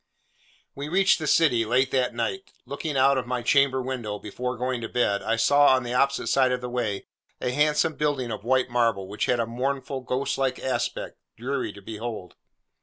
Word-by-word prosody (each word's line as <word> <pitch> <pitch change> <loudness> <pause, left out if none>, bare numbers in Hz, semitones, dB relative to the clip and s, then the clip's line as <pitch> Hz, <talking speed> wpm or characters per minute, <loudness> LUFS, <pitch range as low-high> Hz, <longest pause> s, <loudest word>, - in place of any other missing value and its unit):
We 140 +1 -6
reached 190 +2 +3
the 155 - -3
city, 140 -8 +4
late 125 +4 +1
that 125 -2 0
night. 120 +12 -3
Looking 140 +2 -4
out 135 0 +4
of 125 - -6
my 125 -1 -2
chamber 135 0 +3
window, 120 -5 -4
before 125 +5 -5
going 125 0 -2
to 115 - -5
bed, 105 -5 +1
I 115 - 0
saw, 140 +4 +5
on 130 - -1
the 120 0 -4
opposite 140 +2 +1
side 130 -2 +3
of 125 - 0
the 125 0 -6
way, 110 -5 -2 0.3
a 125 - -1
handsome 150 +3 +2
building 140 -5 -1
of 105 -1 -5
white 130 +1 +1
marble, 115 -6 +1
which 105 +2 -2
had 125 - +2
a 115 - +1
mournful 130 +3 -3
ghost 130 +2 -2
like 135 -1 0
aspect, 120 -2 -3 0.2
dreary 130 +4 -3
to 100 - -13
behold. 110 -3 -6
125 Hz, 195 wpm, -25 LUFS, 115-135 Hz, 0.3 s, saw